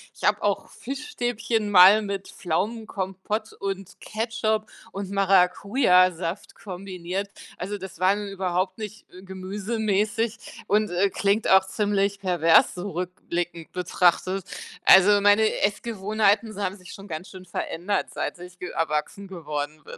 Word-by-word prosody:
Ich - - -15
habe - - +1
auch - - 0
Fischstäbchen 240 -5 -3
mal 195 +3 +8
mit 200 -1 -4
Pflaumenkompott 200 +2 -3
und 195 -1 -6
Ketchup 220 -1 -2 0.2
und 195 -1 -5
Maracujasaft 185 -2 +2
kombiniert. 190 0 -5 0.3
Also, 200 +3 -4
das 190 -2 -9
waren 200 +3 +2
überhaupt 185 -1 -2
nicht, 215 -1 -9
äh, 185 +1 -13
gemüsemäßig 210 +3 -2
und, 210 +1 +2
äh, 185 +3 +2
klingt 200 +3 0
auch 190 0 +6
ziemlich 200 0 0
pervers, 175 -4 +4
so 190 +3 -5
rückblickend 175 -2 -4
betrachtet. 180 +1 +1 0.4
Also, 205 +2 +7
meine 205 +2 +3
Essgewohnheiten 210 +1 +1
s 205 - -11
haben 195 -2 -2
sich 180 -2 -12
schon 195 +1 -11
ganz 160 +1 -6
schön 185 -1 -11
verändert, 180 +2 -2
seit - - -3
ich 180 0 -12
ge 180 - -5
erwachsen 165 +5 -2
geworden 155 -4 -5
bin. - - -10
195 Hz, 130 wpm, -25 LUFS, 180-210 Hz, 0.4 s, mal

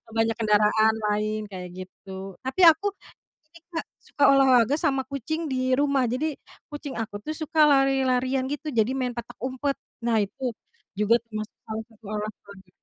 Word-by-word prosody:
banyak 225 0 +2
kendaraan 215 0 +4 0.2
lain 215 +1 -1
kayak 180 -1 -7
gitu. 190 +1 -9
Tapi 265 +8 -3
aku 325 +6 -3 0.7
ini, 335 - -15 0.2
Kak, 325 - -2
suka 285 - -3
olahraga 265 -2 +5
sama 275 -5 +1
kucing 315 +5 -3
di 255 0 +1
rumah, 280 -1 +2
jadi 280 +6 -1 0.4
kucing 290 -2 -6
aku 220 -2 -6
tuh 310 - -3
suka 315 0 0
lari-larian 265 -2 +2
gitu 295 +1 -4
jadi 230 -1 +2
main 255 -2 -1
petak 235 -1 -7
umpet, 265 +2 -1 0.3
nah 235 -1 +2
itu 240 +4 -4 0.4
juga 210 +2 +4
termasuk 215 -1 -6
salah 220 0 -4
satu 225 0 -24
olahraga. 200 -3 -7
250 Hz, 155 wpm, -25 LUFS, 215-275 Hz, 0.7 s, olahraga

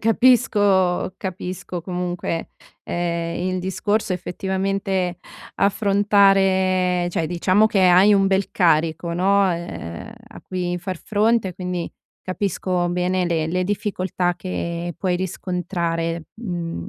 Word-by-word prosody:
capisco 205 -6 +3
capisco 180 -1 -5
comunque, 175 -2 -3 0.4
ehm, 170 -1 -2 0.2
il 185 - -1
discorso. 205 +2 -1
Effettivamente 190 0 -2 0.4
affrontare 195 -3 +3
cioè 165 - -1
diciamo 185 +5 +3
che 205 -3 +1
hai 185 +4 +6
un 195 -1 +3
bel 195 0 +1
carico, 165 0 +1
no, 195 +2 +3
ehm, 170 - -6 0.2
a - - -12
cui 180 -1 -3
far 185 +1 -5
fronte, 215 -2 +1
quindi 180 -2 -4 0.3
capisco 185 -2 -1
bene 180 +1 0
le 165 -2 0
le 180 +3 0
difficoltà 185 -3 -1
che 170 -1 -4
puoi 180 0 0
riscontrare, 170 -2 -3
uhm, 175 - -5
185 Hz, 110 wpm, -22 LUFS, 175-195 Hz, 0.4 s, hai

